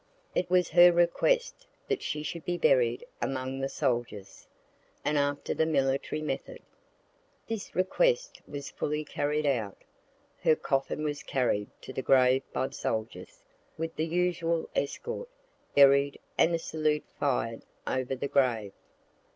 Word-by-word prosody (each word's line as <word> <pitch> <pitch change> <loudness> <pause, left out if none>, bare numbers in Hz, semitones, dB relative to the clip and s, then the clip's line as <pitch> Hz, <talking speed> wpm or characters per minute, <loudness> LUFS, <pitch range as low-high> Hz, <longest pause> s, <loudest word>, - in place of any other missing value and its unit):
It 180 - 0
was 180 -1 +3
her 175 +1 +8
request 475 - +1 0.2
that 415 -3 -1
she 150 0 -3
should 160 +2 -5
be 175 0 -2
buried 125 -6 +3 0.2
among 130 +1 -2
the 135 0 -1
soldiers, 120 -9 -3 0.6
and 150 - +1
after 145 0 0
the 160 - +1
military 140 0 0
method. - - -5 0.8
This 225 -3 -5
request - - +1
was 140 -1 -6
fully 150 +1 -2
carried 150 +1 -1
out. 115 -8 -1 0.6
Her 155 - +5
coffin 135 +2 -1
was 145 -1 -2
carried 110 -6 0
to 130 - -9
the 130 - -2
grave 130 0 +4
by 130 - -1
soldiers, 110 0 -4 0.3
with 165 0 -4
the 160 - -1
usual 170 -1 0
escort, 470 - -3 0.5
buried, 140 0 +5 0.2
and 170 +1 +3
a - - +1
salute 155 -2 -1
fired 125 -5 0 0.2
over 130 0 -1
the 130 - -3
grave. 120 -8 +1
145 Hz, 135 wpm, -29 LUFS, 130-170 Hz, 0.8 s, her